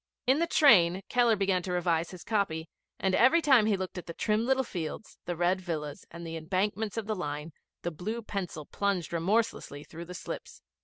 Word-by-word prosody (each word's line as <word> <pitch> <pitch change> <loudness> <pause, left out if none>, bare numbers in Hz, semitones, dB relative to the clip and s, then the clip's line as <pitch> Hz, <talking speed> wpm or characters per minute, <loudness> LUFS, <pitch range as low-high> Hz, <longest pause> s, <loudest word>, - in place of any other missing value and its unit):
In 265 +4 +4
the 335 - +2
train 195 - +5
Keller 240 -2 +4
began 195 -2 +1
to 180 - -5
revise 170 -2 +1
his 180 -2 -10
copy, 180 -7 -1 0.3
and 190 -1 +1
every 260 - +6
time 265 -9 +5
that - - +2
he 205 - +2
looked 185 -1 -4
at - - -11
the 170 - -6
trim 220 +2 +1
little 265 0 +3
fields, 175 -2 -6
the 175 - -2
red 175 +3 +1
villas, 150 -5 -5
and 170 0 -9
the 165 0 -5
embankments 200 +6 -1
of 225 - -2
the 215 - -1
line, 150 -2 -4 0.3
the 175 - -1
blue 215 +9 -4
pencil 180 -7 -4
plunged 195 -3 -1
remorselessly 170 -4 0
through 170 +3 -9
the 180 +1 -8
slips. - - -7
185 Hz, 205 wpm, -29 LUFS, 170-220 Hz, 0.3 s, every